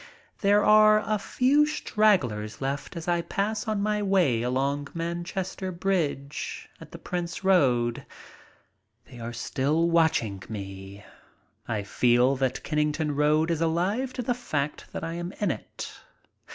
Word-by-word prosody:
There 205 +1 +4
are 215 0 +6
a 215 -1 0
few 280 +8 +3
stragglers 130 - +1
left 140 +5 -4
as 165 - -7
I 175 -1 +2
pass 205 +6 -2
on 215 -2 0
my 210 0 0
way 180 - +2
along 135 +4 -1
Manchester 175 +3 -3
Bridge 165 -6 -2
at - - -12
the - - -8
Prince 175 +1 -4
Road. 125 -11 +3 1.0
They 125 - -13
are 115 0 -5
still 140 +7 0
watching 135 - +2
me. 100 -1 -8 0.6
I 105 -3 -2
feel 125 +5 +3
that 130 -1 -1
Kennington 150 0 0
Road 155 +3 +2
is 165 -1 -1
alive 185 +11 0
to 250 - -4
the 245 - +1
fact 150 - -4
that - - -5
I 165 0 -3
am 175 +2 -5
in 205 -5 0
it. - - -7
165 Hz, 140 wpm, -27 LUFS, 130-195 Hz, 1.0 s, are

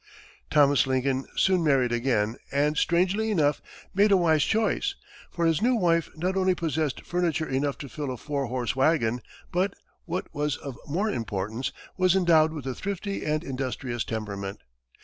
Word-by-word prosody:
Thomas 145 -3 +4
Lincoln 130 0 0
soon 185 -3 +3
married 135 -5 +3
again 115 -2 0
and, 145 +2 +2
strangely 185 +7 +2
enough, 150 -8 +2 0.3
made 205 +2 +4
a 195 - +7
wise 160 -4 +3
choice, 225 - +1 0.3
for 170 -1 -1
his 165 -2 +2
new 250 +2 +3
wife 170 -6 +2
not 180 +4 -1
only 185 -1 +2
possessed 155 -4 -2
furniture 170 -3 0
enough 140 +1 -1
to 140 - -7
fill 145 +1 -5
a 130 - -4
four 140 +2 -3
horse 125 -1 -2
wagon, 130 -4 +2 0.3
but, 185 +3 0 0.3
what 180 +1 -3
was 150 0 -1
of 140 -3 -7
more 195 +9 0
importance, 110 - -3 0.3
was 185 0 +4
endowed 165 -4 +4
with 150 -4 -7
a 130 - -2
thrifty 200 +5 -4
and 155 +1 0
industrious 130 -3 -3
temperament. 100 -3 -5
150 Hz, 165 wpm, -26 LUFS, 130-180 Hz, 0.3 s, a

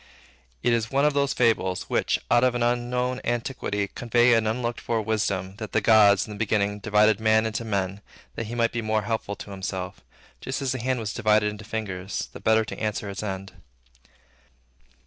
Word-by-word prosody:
It 120 - +3
is 115 -1 0
one 140 +1 +2
of 150 - +3
those 140 -1 +1
fables, 110 -6 +1
which, - - 0
out 120 - +5
of 125 -1 +3
an 120 - 0
unknown 125 +1 0
antiquity, 120 -4 -2
convey 120 +2 +2
an 115 -1 +2
unlooked 120 +1 -2
for 115 -1 -1
wisdom, 100 -3 -1
that 110 -1 -7
the - - +4
gods, 105 -2 +5
in 105 - -8
the 105 - -10
beginning, 105 -2 0
divided 105 0 +3
Man 110 0 +3
into 110 +1 -2
men, 100 -2 -2 0.3
that 115 - -5
he 120 - -5
might 115 -1 +2
be 120 - -2
more 110 -1 0
helpful 110 -2 -3
to 100 - -10
himself; 95 -1 -5 0.4
just - - -3
as 135 -2 -1
the 130 - -2
hand 130 +1 -1
was 110 -2 -4
divided 105 -2 +2
into 105 0 -10
fingers, 100 -4 -4
the - - -8
better 110 0 +3
to - - -7
answer 105 -2 -2
its 100 - -5
end. 95 -2 -5
110 Hz, 195 wpm, -25 LUFS, 105-120 Hz, 0.4 s, out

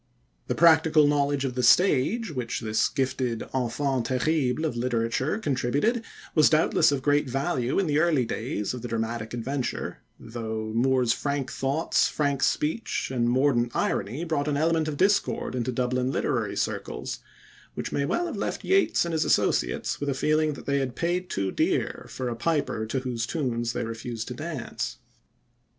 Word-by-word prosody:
The 125 - -1
practical 160 -1 +5
knowledge 145 -1 +1
of 130 - -2
the 125 - -1
stage 170 - +3
which 125 -6 -3
this 110 -1 +1
gifted 130 -3 -1
enfant 130 0 -1
terrible 135 +2 +1
of 150 - -2
literature 120 - 0
contributed 145 - 0 0.3
was 155 -2 +6
doubtless 155 0 +4
of 135 -2 -1
great 145 -1 +2
value 135 -2 -1
in 195 - +2
the 150 -2 +2
early 155 -6 +3
days 110 -2 -3
of 125 - -6
the 120 - -5
dramatic 115 -1 -3
adventure, 130 +2 -3 0.2
though 110 -1 -5
Moore's 125 0 +3
free 140 -1 -1
thoughts, 140 +6 +1
frank 140 -3 -1
speech, 155 - 0
and 120 -2 +1
mordant 120 -2 +2
irony 115 - -1
brought 160 -4 -1
an 145 -1 0
element 160 +1 +2
of 150 -2 -3
discord 200 -5 +1
into 125 0 -1
Dublin 125 +1 0
literary - - -1
circles, - - -3 0.6
which - - -4
may 140 - 0
well 345 - 0
have 345 - -4
left - - -3
Yeats 385 - +3
and 170 - -3
his 160 - +2
associates - - +1
with 145 - -2
a 135 - 0
feeling 155 +2 +2
that - - -10
they 140 0 +1
had 130 -2 -3
paid 180 +3 -1
too 95 -1 -1
dear - - -1
for 130 - -4
a 120 - -2
piper 120 -4 -1
to 130 +4 -2
whose 120 -3 -3
tunes 120 -7 -1
they - - -2
refused 115 0 -5
to - - -4
dance. 150 -2 -5
135 Hz, 170 wpm, -26 LUFS, 120-155 Hz, 0.6 s, was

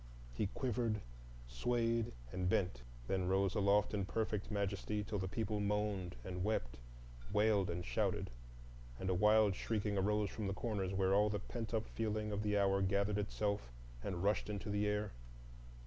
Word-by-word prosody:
He 100 - 0
quivered, 115 -1 -1 0.5
swayed, 115 - 0 0.2
and 90 0 -1
bent; 90 -11 +1 0.3
then 95 -2 0
rose 95 0 +2
aloft 100 0 +3
in 100 -2 0
perfect 105 0 -1
majesty, 105 0 -1
till 105 0 -3
the 95 - -1
people 105 +1 -1
moaned 100 -5 0
and 90 -1 -3
wept, 60 - -1 0.5
wailed 105 -3 +3
and 85 0 -3
shouted, - - 0 0.7
and 95 - 0
a - - +3
wild 105 +2 +5
shrieking 105 0 -1
arose 105 +1 +1
from 105 -3 -3
the 100 - -1
corners 100 -4 -1
where 95 0 +2
all 105 +1 +5
the 105 - 0
pent 115 +2 -5
up 110 -1 0
feeling 110 -1 -2
of 105 0 -1
the 105 -1 +1
hour 100 -1 +3
gathered 100 +2 +2
itself 100 - -1 0.3
and 90 -2 -2
rushed 105 +1 +2
into 105 0 -3
the 105 0 +1
air. 105 0 0
105 Hz, 165 wpm, -37 LUFS, 95-105 Hz, 0.7 s, wild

